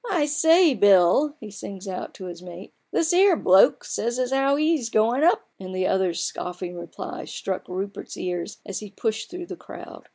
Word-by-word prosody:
" 480 - -7
I - - +3
say, 320 +2 +4
Bill! 205 - +4
" - - -41
he 215 -2 -9
sings 195 -1 -8
out 185 -1 -6
to 190 - -9
his 175 -1 -8
mate, 180 +1 -11
" - - -48
this 335 +1 +1
'ere 380 0 +5
bloke 190 +1 +5
sa) - - -4
s 235 +1 -1
as 255 0 -1
'ow 270 +1 +3
he's 305 -5 +1
goin' 230 +6 +2
up! 345 - +3
" - - -49
and 185 -1 -7
the 185 0 0
other's 185 -3 0
scoffing 180 0 -5
reply 340 - -7
struck 190 -1 -5
Rupert's 195 +2 -6
ears 175 -1 -4
as 195 - -5
he 210 - -9
pushed 220 - -3
through 355 0 -7
the - - -7
crowd. - - -12
210 Hz, 220 wpm, -24 LUFS, 185-295 Hz, -, ere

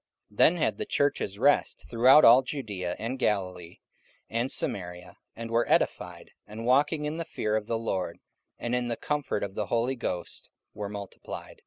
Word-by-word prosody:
44:009:031 105 - -21
Then 175 - +6
had 160 - 0
the - - -2
churches 140 -8 0
rest 140 +6 +2
throughout 125 +6 +6
all 120 +3 +8
Judaea 105 -10 -4
and 125 +4 -4
Galilee 90 -6 -2 0.5
and 120 +4 -1
Samaria, 90 -7 -4 0.2
and 115 0 -7
were 115 +1 +1
edified; 90 -1 0 0.2
and 110 +2 -7
walking 145 +4 +2
in 150 +2 -3
the 165 - -2
fear 110 -9 -2
of 110 -1 -2
the 115 - 0
Lord, 95 -6 -3 0.4
and 120 - -3
in 125 -1 0
the 115 -1 -2
comfort 145 -7 -2
of 100 -1 -4
the 105 0 -3
Holy 120 +3 0
Ghost, 90 -8 -5 0.2
were 105 -1 -5
multiplied. 100 -1 -8
115 Hz, 175 wpm, -28 LUFS, 100-130 Hz, 0.5 s, all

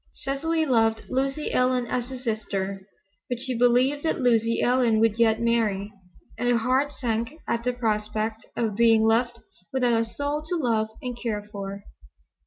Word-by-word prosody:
Cecily 315 +4 -1
loved 225 -4 +2
Lucy 270 +3 -1
Ellen 250 -1 +2
as 245 0 -3
a 260 - -6
sister. 200 -5 -3 0.4
But 245 - -1
she 255 0 -2
believed 250 +4 +3
that 320 - -1
Lucy 230 -2 +2
Ellen 245 -3 +3
would 225 0 +2
yet 220 -1 +4
marry, 215 -3 0 0.5
and 245 0 +1
her 240 - +4
heart 260 +5 +1
sank 235 -1 -2
at 235 - -1
the 250 - +1
prospect 215 -1 -2
of 220 -4 0
being 225 0 +5
left 235 +2 +1 0.3
without 245 -3 +2
a - - +1
soul 285 +5 -3
to 320 +3 -3
love 230 -8 +1 0.2
and 250 -1 -4
care 210 -3 -3
for. 200 0 -6
235 Hz, 165 wpm, -25 LUFS, 220-255 Hz, 0.5 s, being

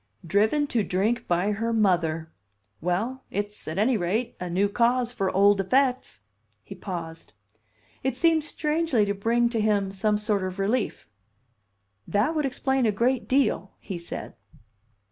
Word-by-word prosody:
"Driven 215 - +2
to 230 -3 +1
drink 205 +6 0
by 175 +4 +1
her 225 +3 -1
mother! 170 -7 +1 0.5
Well, 220 +10 -1
it's, 205 +1 -5
at 160 +3 -4
any 225 +4 +3
rate, 205 +7 -1
a 180 - -4
new 190 +4 +2
cause 240 +3 +1
for 195 -6 -1
old 200 +1 +4
effects." 255 - +1 0.4
He 195 - -9
paused. 170 -4 -7 0.7
It 265 -1 -1
seemed 325 -1 +3
strangely 300 -6 +1
to 200 - -1
bring 230 +4 +1
to 230 -2 -1
him 205 -2 +1
some 210 +2 +1
sort 210 -1 0
of 185 0 -4
relief. 210 +4 -1 1.0
"That 210 +10 +1
would 305 -3 0
explain 265 -1 0
a - - +3
great 240 +4 0
deal," 255 -7 +1
he 185 -3 -6
said. 170 - -7
210 Hz, 150 wpm, -26 LUFS, 190-250 Hz, 1.0 s, old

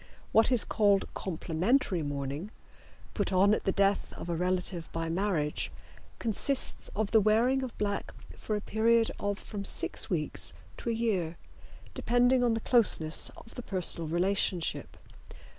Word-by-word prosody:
What 225 +3 +4
is 245 -4 +3
called 205 -3 +2
complimentary 185 - 0
mourning, 145 +4 -4 0.6
put 205 -2 -1
on 195 +2 +4
at - - -1
the 195 - +3
death 195 +1 +1
of - - -8
a 170 - 0
relative 180 -1 -1
by 165 0 -3
marriage, 165 -4 -1 0.5
consists 250 +4 -1
of 210 0 -1
the 220 - +5
wearing 230 +6 +3
of 255 -3 -6
black 205 -1 -2 0.2
for 215 - -3
a 210 - -2
period 225 +2 +2
of 205 0 -1
from 205 -2 -6
six - - -2
weeks - - -3 0.2
to - - -4
a - - +1
year, 190 -8 -1 0.6
depending 245 +1 +3
on 235 -2 +2
the 225 - -3
closeness 200 -11 +3
of 230 - -14
the - - -6
personal 180 -6 +1
relationship. 175 0 -1
200 Hz, 150 wpm, -30 LUFS, 175-225 Hz, 0.6 s, the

